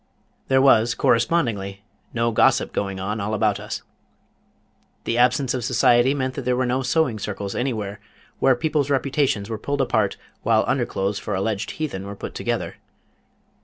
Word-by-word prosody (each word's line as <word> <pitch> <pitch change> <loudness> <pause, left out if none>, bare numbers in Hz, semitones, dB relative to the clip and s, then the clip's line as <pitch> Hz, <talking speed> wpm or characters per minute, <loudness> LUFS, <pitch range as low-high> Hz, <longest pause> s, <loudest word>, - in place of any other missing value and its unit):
There 130 0 +4
was 120 -3 +5
correspondingly 105 -8 +1 0.3
no 115 0 0
gossip 110 - +3
going 100 -1 -2
on 105 +3 -3
all 105 +2 -1
about 105 -1 +1
us. - - -6 1.2
The 115 - -1
absence 125 +1 +3
of 125 -2 -2
society 120 +2 +3
meant 130 -2 -2
that 140 - -4
there 125 0 0
were 130 +1 +1
no 125 +2 0
Sewing 130 -3 +1
Circles 100 -1 -4
anywhere 110 -6 -3 0.4
where 130 - +4
peoples' 150 0 0
reputations 135 -6 +1
were 110 -2 -4
pulled 140 +4 -2
apart 110 -6 +1 0.2
while - - +3
under - - 0
clothes 100 +1 -2
for 105 0 -3
alleged 100 +1 -2
heathen 125 -12 -4
were 100 - -6
put - - -7
together. - - -3
120 Hz, 165 wpm, -23 LUFS, 105-130 Hz, 1.2 s, was